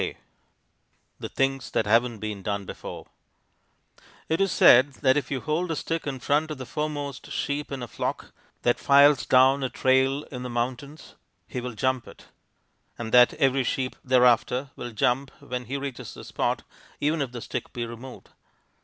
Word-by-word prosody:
_ - - -3 1.0
THE - - -6
THINGS 135 -1 -1
THAT - - 0
HAVEN'T 115 +2 +2
BEEN 105 -1 -5
DONE 100 0 -3
BEFORE - - -8 1.2
It 160 +3 +1
is 195 -2 +2
said 130 +3 +6
that 130 -1 +5
if 145 - -1
you 130 -3 -2
hold 165 +3 -1
a 160 - -1
stick 165 0 -3
in 135 -2 -3
front 150 +5 +1
of 155 - -5
the 130 - -7
foremost 145 -2 -4
sheep 145 +1 -3
in 135 -3 -4
a - - -5
flock - - -4 0.3
that 120 - +2
files 140 -4 +5
down 130 +2 +5
a 130 - 0
trail 130 +3 +2
in 125 -2 -6
the 125 - -5
mountains, 125 +5 -4 0.3
he 125 - -5
will 125 0 -5
jump 130 +2 -1
it - - -15 0.7
and 110 -1 -5
that 125 -1 +7
every 135 -2 +2
sheep 130 +1 -2
thereafter 125 +1 +3
will 120 - -6
jump 125 +5 +1
when 125 0 -5
he 135 +5 -3
reaches 140 -2 -6
the - - -10
spot, - - -2 0.4
even 150 +1 +1
if 135 -3 -2
the 125 - -6
stick - - -5
be 120 -2 -4
removed. 120 +2 -10
130 Hz, 180 wpm, -26 LUFS, 120-140 Hz, 1.2 s, that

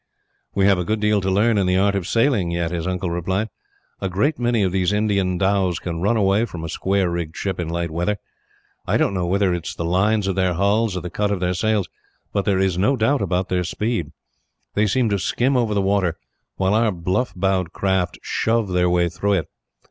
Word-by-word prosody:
"We 100 - +3
have 100 -2 +4
a - - 0
good 110 +5 -1
deal 105 -1 +2
to 95 - -1
learn 105 +3 +3
in 95 - +1
the 90 0 +2
art 100 +1 +3
of 95 -3 -2
sailing, 115 -7 +2
yet," 85 -1 -1
his 85 0 -3
uncle 90 -1 -2
replied. 95 +5 -1 0.5
"A 95 - -2
great 125 - 0
many 120 -3 +1
of 95 - +1
these 95 0 +1
Indian 100 -3 +1
dhows 95 -2 +1
can 85 -2 -5
run 110 +5 +2
away 100 +2 +3
from 85 -8 -8
a 80 - -4
square 95 +3 0
rigged 85 -2 -4
ship, 95 -3 -3
in 85 -2 -2
light 85 0 -2
weather. 90 +6 -1 0.7
I - - +2
don't - - +1
know 90 -2 -1
whether 95 0 +2
it 85 -2 -4
is - - -5
the 85 - -3
lines 100 +5 +2
of 95 - 0
their 95 -2 +1
hulls 100 +2 +1
or - - -3
the 90 +1 -6
cut 105 +1 0
of 100 -2 -1
the 90 0 0
sails, 105 +1 0 0.5
but 100 - 0
there 100 -2 +2
is 95 -2 +1
no 120 +9 +3
doubt 130 +5 +2
about 90 0 -1
their 90 -1 0
speed. 90 -3 -2 0.6
They 105 +1 +2
seem 125 +3 +2
to 100 -1 0
skim 125 +8 +1
over 115 -4 +1
the 100 - +1
water, 95 -4 +1 0.4
while 95 +1 +1
our 110 0 +3
bluff 90 +7 -1
bowed 95 -2 0
craft 95 -2 0
shove 115 -2 0
their 90 -1 +2
way 90 0 +2
through 100 +4 -1
it. 95 -5 -1
95 Hz, 230 wpm, -21 LUFS, 90-105 Hz, 0.7 s, have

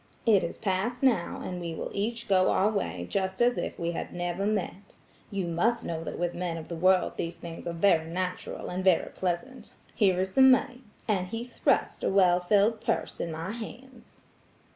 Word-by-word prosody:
It 210 -5 +5
is 170 - -4
past 220 +5 -1
now, 230 -10 +2
and 180 -1 -5
we 170 -1 -4
will - - -5
each 230 +4 -2
go 185 -2 +4
our 205 +3 +3
way 200 -2 -2
just 190 -1 -2
as 245 0 +4
if - - -4
we 170 0 -2
had 170 - -5
never 175 +3 -2
met. 205 -1 -3 0.3
You 195 -3 -2
must 220 +8 0
know 165 -1 -3
that - - -5
with 175 0 -1
men 175 -2 -3
of 160 - -8
the 170 - -4
world 185 +2 +2
these 165 0 -3
things 170 0 -8
are 170 - -2
very 165 -2 +3
natural 180 +1 -4
and 185 +1 -3
very 185 -3 +3
pleasant. 190 +9 -4 0.2
Here 190 -4 +3
is 190 0 -1
some 265 0 +7
money; 255 -1 +2 0.3
and 190 -4 0
he 225 +5 -4
thrust 245 - 0
a - - +2
well 185 -2 +4
filled 205 +4 +2
purse 230 0 -2
in 170 - -3
my 165 +4 -4
hands. 240 +2 -10
190 Hz, 200 wpm, -28 LUFS, 175-225 Hz, 0.3 s, some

